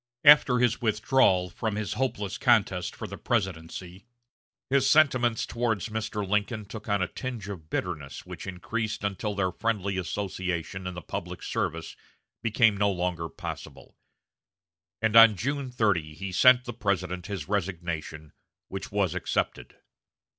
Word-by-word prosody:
After 145 -4 +8
his 120 -1 +2
withdrawal 105 -5 +3
from 110 +4 -3
his 105 -1 -2
hopeless 105 -7 -2
contest 100 -7 +2
for - - -6
the - - -8
presidency, 95 -1 -3 0.6
his 135 0 +3
sentiments 130 -6 +4
toward 115 -4 -1
Mr. 110 -1 -3
Lincoln 105 +2 0
took 105 +1 -9
on 100 -2 +2
a - - -1
tinge 120 -4 -6
of 80 -6 -8
bitterness 75 -7 -4
which - - -8
increased 105 +4 -3
until 100 +1 -2
their 95 -2 0
friendly 100 -1 -1
association 95 -1 -3
in 90 - -5
the 85 - -7
public - - -6
service 80 +1 -3 0.5
became 115 -1 +3
no 100 0 +3
longer 90 -3 -2
possible; - - -8 1.1
and 110 0 +2
on 115 -2 +9
June 140 +5 -2
30 100 -11 0
he 95 +3 -5
sent 125 +6 +6
the 120 - -5
President 95 -5 -2
his 95 -7 -5
resignation, 85 -6 -3 0.4
which - - -6
was - - +1
accepted. - - -2
100 Hz, 140 wpm, -27 LUFS, 90-115 Hz, 1.1 s, on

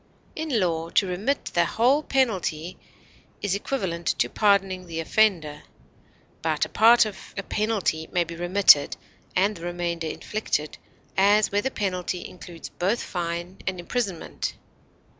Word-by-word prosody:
In 310 -7 -1
law, 165 -3 0
to 195 - +3
remit 200 +10 -1
the 170 0 +3
whole 245 - +3
penalty 185 - 0 0.7
is 205 -2 +1
equivalent 190 -6 -3
to - - +1
pardoning 195 -3 +2
the 165 -1 -4
offender; 165 -5 +1 0.8
but - - +1
a - - -10
part 230 +1 +6
of 210 -3 -9
a 200 - -2
penalty 200 -7 -1
may 175 -2 +2
be 170 0 -8
remitted 175 -3 +5 0.4
and 200 +3 +2
the 165 - -11
remainder 175 -1 -3
inflicted, 155 -3 -3 0.4
as 205 +2 +4
where 205 +1 +2
the 265 - -1
penalty 185 -5 -3
includes 175 -2 -10
both 195 +7 -1
fine 175 +1 -4
and 185 -1 -2
imprisonment. 195 -1 -3
185 Hz, 140 wpm, -25 LUFS, 170-210 Hz, 0.8 s, part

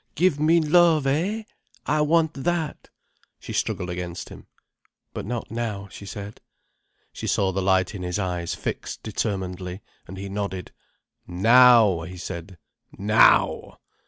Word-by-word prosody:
Give 170 -2 +2
me 160 +3 +4
love, 160 -1 +4
eh? 180 +11 0 0.4
I 150 +2 +1
want 160 +1 +2
that." 160 +2 -3 0.5
She - - -8
struggled 90 0 -2
against 90 0 -6
him. - - -13 0.7
"But - - -6
not 120 -2 -4
now," 110 -4 -4
she 100 - -10
said. 100 +1 -8 0.7
She - - -6
saw 95 -1 +1
the 95 +1 -2
light 95 +1 +2
in 100 - -6
his 90 -1 -2
eyes 90 -4 -2
fix - - -5
determinedly, 95 -1 -4 0.3
and 95 - -9
he 100 +1 -6
nodded. 100 -2 -4 0.6
"Now!" 115 0 +6
he 90 +3 -8
said. 90 +1 -7 0.4
"Now!" 105 +2 +3
100 Hz, 135 wpm, -24 LUFS, 90-145 Hz, 0.7 s, Now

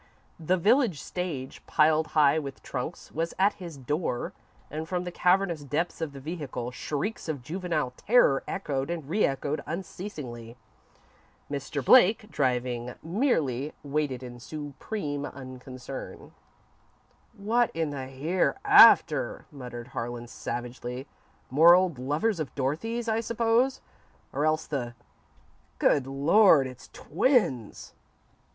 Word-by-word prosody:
The 175 +3 +1
village 215 - +3
stage, 160 -8 -5
piled 155 0 +3
high 150 +1 +5
with 140 -3 -8
trunks, 135 +6 -5
was 165 +1 -3
at 200 +2 +4
his 170 -5 -7
door, 135 -1 -2 0.4
and 155 +2 -5
from 180 -1 -1
the 180 - -5
cavernous 180 -3 +2
depths 160 +5 -2
of 160 -3 -2
the 140 - -10
vehicle, 140 -5 -5
shrieks 155 - -4
of 145 -5 -3
juvenile 160 -3 -2
terror 200 - +4
echoed 145 -7 -3
and 165 -5 -4
re 200 +8 +1
echoed 140 +2 -2
unceasingly. 150 - -7 0.9
Mr. 140 -1 -4
Blake, 215 - +5
driving, 125 -2 -1
merely 160 - 0
waited 140 -3 -2
in 120 -1 -9
supreme 145 - -5
unconcern. 130 -1 -8 1.1
"What 230 +4 +2
in 160 -2 -1
the 135 -2 -5
hereafter," 185 - +4
muttered 125 -3 -8
Harlan, 120 -1 -5
savagely. 120 +2 -5 0.5
"More 165 +6 +8
old 180 -7 +1
lovers 155 - 0
of 145 -6 -4
Dorothy's, 225 - -2
I 220 0 +1
suppose, 230 +3 +1 0.5
or 145 +3 +1
else 155 0 +1
the 120 -5 -4 0.8
Good 135 -2 +2
Lord, 145 +3 +5
it's 130 -1 -9
twins!" 160 - 0
150 Hz, 120 wpm, -27 LUFS, 130-180 Hz, 1.1 s, More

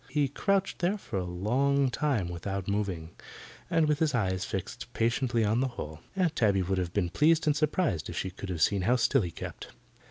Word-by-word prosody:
He 145 -3 +1
crouched 195 +7 0
there 185 +4 +1
for 105 - -4
a 90 - -3
long 130 +10 +1
time 125 -10 0
without 95 +2 -4
moving, 95 -5 -2 0.6
and 160 -2 +3
with 150 -1 +1
his 155 -5 +2
eyes 95 -4 0
fixed 95 -2 -5
patiently 120 0 +1
on 110 +3 +2
the 135 - +2
hole. 75 +1 -6 0.2
Aunt 180 -4 +1
Tabby 100 -7 +3
would 95 +1 0
have 90 -2 -2
been 90 -3 0
pleased 160 +2 +3
and 150 -1 +3
surprised 150 - 0
if - - -6
she 95 - -2
could 95 +1 -8
have 85 -4 0
seen 100 -2 +2
how 120 +7 +3
still 130 +2 +3
he 90 - -2
kept. - - -7
110 Hz, 210 wpm, -29 LUFS, 95-145 Hz, 0.6 s, and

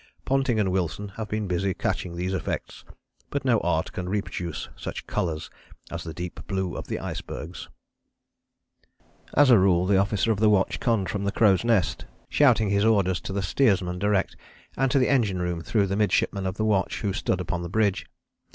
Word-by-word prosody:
Ponting 135 -4 +1
and 95 -3 +1
Wilson 95 +2 -2
have 110 +2 -6
been 105 0 -2
busy 90 +1 0
catching 85 -1 -2
these 90 +2 -2
effects, 95 - -4 0.5
but 140 -1 -3
no 120 -4 +4
art 80 -2 0
can 90 -1 -5
reproduce 90 -4 -3
such - - -6
colours 80 -3 -3 0.4
as 85 0 -5
the 80 - -6
deep 85 +3 -6
blue 95 -2 -2
of - - -6
the - - -2
icebergs." 85 +4 -6 1.7
As 145 -2 +6
a 115 - +8
rule 90 -2 +3
the 95 0 +3
officer 100 +3 +1
of 105 - -1
the 110 0 +5
watch 100 -2 +2
conned 110 -7 +1
from 100 -1 -2
the 100 - 0
crow's 100 -4 +3
nest, 115 -7 +1 0.2
shouting 115 -8 +4
his 100 0 +2
orders 95 -5 +2
to - - -6
the 100 0 -2
steersman 95 -5 +1
direct, 100 0 +1 0.4
and 135 +1 +1
to 140 - +2
the 125 - +3
engine 110 -9 +2
room 90 -1 -2
through 100 +5 +1
the 100 0 -2
midshipman 100 -1 +1
of 95 +2 -4
the 110 - 0
watch, 100 -4 0
who 100 -3 -1
stood - - -1
upon 90 - -3
the 85 - -5
bridge. 105 0 +1
100 Hz, 190 wpm, -26 LUFS, 90-110 Hz, 1.7 s, a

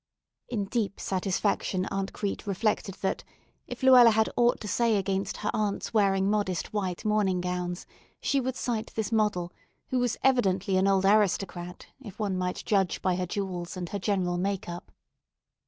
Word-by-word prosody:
In 210 -5 -1
deep 210 -1 -2
satisfaction 190 0 -1
Aunt 195 0 -2
Crete 205 +1 -4
reflected 200 -1 -1
that, 190 - -1 0.4
if - - -8
Luella 255 -3 +8
had 220 0 +2
aught 240 0 +3
to 210 - -5
say 230 +1 +2
against 195 0 -2
her 210 - -2
aunt's 210 0 -2
wearing 195 -3 +3
modest 200 -5 -1
white 190 -1 -2
morning 210 -4 +2
gowns, 180 0 -3 0.3
she 280 - +1
would 260 0 -2
cite 230 -4 -3
this 220 0 -2
model, 210 -6 0 0.4
who 255 - +1
was 245 -2 0
evidently 195 -7 +2
an 190 +1 +3
old 195 -1 +3
aristocrat 195 -3 +1 0.2
if 210 -6 -10
one 205 -3 -1
might 180 0 -3
judge 195 -4 +1
by 185 -1 +2
her 180 0 -2
jewels 185 -2 -4
and 175 -2 -4
her 200 - -3
general 180 -2 0
make 195 +1 -2
up. 175 0 -7
195 Hz, 170 wpm, -28 LUFS, 185-215 Hz, 0.4 s, Luella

